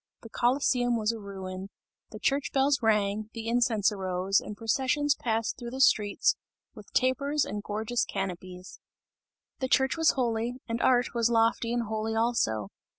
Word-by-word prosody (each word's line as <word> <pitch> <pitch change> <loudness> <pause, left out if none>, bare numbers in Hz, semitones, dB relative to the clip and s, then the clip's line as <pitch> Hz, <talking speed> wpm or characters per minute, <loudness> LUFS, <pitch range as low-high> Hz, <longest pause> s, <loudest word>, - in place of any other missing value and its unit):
The 230 - -10
Colosseum 245 -1 +1
was 215 0 +1
a 230 - -7
ruin; 190 -1 -7 0.4
the - - -9
church 275 0 0
bells 275 +1 +2
rang, 210 -1 +1
the 225 -1 -6
incense 230 -3 +2
arose 190 -1 0
and 210 - -8
processions 270 +6 +1
passed 225 -5 -2
through 240 -1 -6
the 260 +2 -6
streets 210 -6 +3 0.4
with - - -14
tapers 280 +3 +1
and 205 - -4
gorgeous 220 +3 -2
canopies. 185 -1 -6 0.8
The 260 - -1
Church 265 +3 +2
was 325 -1 +4
holy, 235 -1 -1
and 230 0 -2
art 250 -1 +3
was 235 -1 +2
lofty 230 0 +2
and 240 0 0
holy 220 0 -3
also. 165 - 0
230 Hz, 155 wpm, -28 LUFS, 205-250 Hz, 0.8 s, was